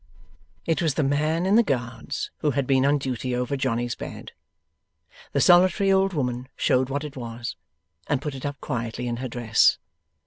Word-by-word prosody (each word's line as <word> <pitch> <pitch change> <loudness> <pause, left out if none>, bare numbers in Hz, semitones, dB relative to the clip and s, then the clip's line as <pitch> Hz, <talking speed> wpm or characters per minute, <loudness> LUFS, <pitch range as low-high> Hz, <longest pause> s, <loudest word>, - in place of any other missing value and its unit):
It 165 +2 +1
was 160 -5 +1
the 155 - +1
man 155 +5 +1
in 200 +3 +4
the - - +7
Guards 125 - -3
who 150 - +1
had 140 -1 0
been 135 0 +3
on 145 +1 +3
duty 130 -2 -3
over 125 +3 -1
Johnny's 120 -3 -1
bed. - - -8 1.0
The - - 0
solitary 185 +3 +5
old 195 0 +3
woman 125 -4 -2
showed 130 0 +2
what 140 +2 -2
it 150 -1 -7
was, 120 -1 -6 0.5
and 145 - +1
put 145 +1 -4
it 135 - -8
up 145 0 -4
quietly 120 -2 -3
in 120 -1 -2
her 130 +2 -4
dress. 115 -2 +3
135 Hz, 180 wpm, -25 LUFS, 125-150 Hz, 1.0 s, the